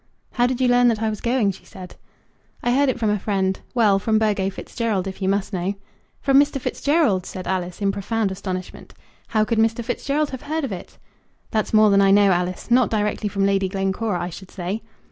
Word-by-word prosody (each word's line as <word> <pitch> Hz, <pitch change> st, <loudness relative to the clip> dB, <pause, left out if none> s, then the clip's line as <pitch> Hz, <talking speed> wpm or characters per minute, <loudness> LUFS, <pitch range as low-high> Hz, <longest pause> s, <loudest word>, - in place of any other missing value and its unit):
"How 245 Hz, 0 st, +2 dB
did 255 Hz, 0 st, -2 dB
you 255 Hz, -, +3 dB
learn 245 Hz, 0 st, +5 dB
that 225 Hz, -2 st, +1 dB
I 220 Hz, -, +1 dB
was 215 Hz, -, -6 dB
going?" 235 Hz, -4 st, +1 dB
she 190 Hz, -, -14 dB
said. 185 Hz, -4 st, -11 dB, 0.7 s
"I 240 Hz, -, +2 dB
heard 280 Hz, +1 st, +3 dB
it 260 Hz, -, -1 dB
from 220 Hz, -3 st, +1 dB
a 210 Hz, -, 0 dB
friend 190 Hz, -2 st, 0 dB
of -, -, -24 dB
mine. -, -, -33 dB
Well; 210 Hz, -5 st, +4 dB
from 220 Hz, +2 st, +1 dB
Burgo 205 Hz, -3 st, +1 dB
Fitzgerald, 205 Hz, -1 st, -3 dB
if 195 Hz, +1 st, -7 dB
you 190 Hz, -, +1 dB
must 200 Hz, +1 st, -1 dB
know." 185 Hz, +2 st, -1 dB, 0.5 s
"From 275 Hz, -1 st, +5 dB
Mr. 285 Hz, -1 st, +2 dB
Fitzgerald?" 280 Hz, -, +1 dB
said 185 Hz, -1 st, -7 dB
Alice, 180 Hz, +1 st, -3 dB
in 195 Hz, -, +3 dB
profound 205 Hz, +1 st, -1 dB
astonishment: 185 Hz, -1 st, -6 dB, 0.3 s
"How 215 Hz, -1 st, +1 dB
could 230 Hz, 0 st, 0 dB
Mr. 225 Hz, +1 st, +1 dB
Fitzgerald 295 Hz, +4 st, -1 dB
have 260 Hz, -, -6 dB
heard 315 Hz, +1 st, -3 dB
of 270 Hz, -, -3 dB
it?" 185 Hz, -, -8 dB, 0.5 s
"That's 215 Hz, -2 st, -1 dB
more 215 Hz, -1 st, +5 dB
than 200 Hz, 0 st, +5 dB
I 195 Hz, -, +4 dB
know, 200 Hz, 0 st, +5 dB
Alice. 180 Hz, +5 st, -2 dB
Not 250 Hz, +1 st, +4 dB
directly 210 Hz, -1 st, -1 dB
from 195 Hz, 0 st, 0 dB
Lady 195 Hz, -1 st, +1 dB
Glencora, 195 Hz, 0 st, -1 dB
I 175 Hz, +1 st, -4 dB
should 190 Hz, +2 st, -10 dB
say." 190 Hz, +4 st, -4 dB
210 Hz, 220 wpm, -22 LUFS, 190-235 Hz, 0.7 s, learn